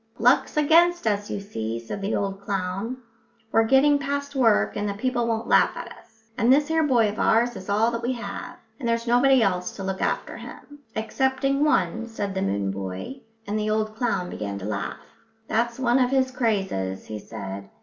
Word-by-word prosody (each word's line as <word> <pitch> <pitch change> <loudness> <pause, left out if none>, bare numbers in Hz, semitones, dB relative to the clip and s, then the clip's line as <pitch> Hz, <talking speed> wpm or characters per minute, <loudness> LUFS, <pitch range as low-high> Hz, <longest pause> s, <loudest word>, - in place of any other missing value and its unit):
"Luck's 245 +6 +3
against 335 +3 +4
us, 205 -1 0
you - - -3
see," 115 - -4
said 115 - -6
the 200 +2 -1
old 195 -1 -2
clown. 195 +4 -3 0.5
"We're 225 0 +4
getting 280 +4 +5
past 280 0 -3
work, 230 -5 +3
and 205 0 -1
the 200 - -3
people 240 +2 0
won't 225 -1 -1
laugh - - +4
at - - -7
us. 225 0 -23
And 235 +2 +4
this 290 +3 +4
here 320 0 +2
boy 250 -7 +3
of 210 +1 -4
ours 235 +2 +3
is 190 - -9
all 215 +3 +3
that 230 0 -3
we 245 +2 -1
have, 235 -2 -6 0.2
and 240 -4 -2
there's 230 0 0
nobody 245 +1 +4
else 180 -2 -1
to 195 - -6
look 190 0 -3
after - - -1
him." 290 0 -11 0.2
"Excepting 265 +5 0
one," 235 -7 +1
said 205 -4 -4
the 190 - -2
moon 100 0 0
boy, 95 - -6 0.3
and 210 +1 -2
the 215 0 -1
old 215 0 0
clown 200 -7 -1
began 100 -1 -4
to 95 - -7
laugh. 100 -3 -3 0.5
"That's 235 +1 0
one 255 -1 +2
of 250 -1 +3
his 260 -1 +2
crazes," 195 - -1
he 110 -1 -6
said. 100 0 -7
225 Hz, 200 wpm, -25 LUFS, 195-260 Hz, 0.5 s, getting